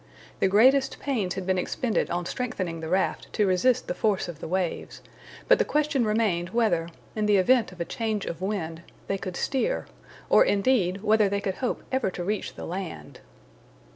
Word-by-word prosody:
The - - +3
greatest 260 +8 +4
pains 220 -10 -1
had 190 -1 -4
been 185 0 +1
expended 225 +4 -1
on 175 0 -2
strengthening 185 -8 -3
the 160 0 -5
raft 190 +2 0
to 210 - +2
resist 190 +7 +2
the - - -1
force 200 0 0
of 170 -4 -8
the - - -6
waves, 180 0 -3 0.4
but - - +6
the - - +4
question 300 -4 +1
remained 210 -5 +1
whether, 195 -8 +1 0.3
in 215 -1 0
the 205 -1 +5
event 235 +4 +3
of 180 - -14
a 170 - -1
change 220 -1 -2
of 170 - -5
wind, 170 -5 -3 0.2
they 195 - -2
could 185 -2 -5
steer, 285 - -1 0.4
or - - +6
indeed, 200 -3 +1
whether 215 -1 +4
they 200 0 0
could 195 -2 -3
hope 250 - -2
ever 260 -6 +1
to 180 -1 -5
reach 210 +3 -3
the - - -7
land. 170 - -6
200 Hz, 190 wpm, -26 LUFS, 180-230 Hz, 0.4 s, but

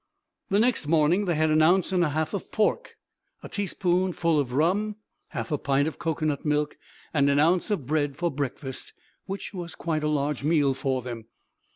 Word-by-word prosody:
The 200 - +2
next 235 -9 +2
morning 165 +5 +3
they 175 -3 +1
had 155 0 +2
an 155 0 +4
ounce 180 +4 +4
and 180 -2 +3
a 160 - +2
half 155 +4 -1
of 200 - -5
pork, 215 - 0 0.5
a - - -6
teaspoonful 180 -4 0
of 130 -4 -1
rum, 190 +10 +1 0.3
half - - -5
a 150 - 0
pint 140 +1 +1
of 160 - -5
cocoanut 155 -3 -1
milk 150 0 0 0.4
and 140 -2 +3
an 140 - +3
ounce 170 +6 +3
of 200 -11 -1
bread 145 0 0
for 170 -1 0
breakfast, 135 -1 -4 0.3
which 195 +2 -5
was 175 -3 -6
quite 155 -2 -2
a - - +1
large 145 -2 -1
meal 145 -3 +3
for 130 -1 -2
them. 120 -3 -6
155 Hz, 190 wpm, -26 LUFS, 145-175 Hz, 0.5 s, an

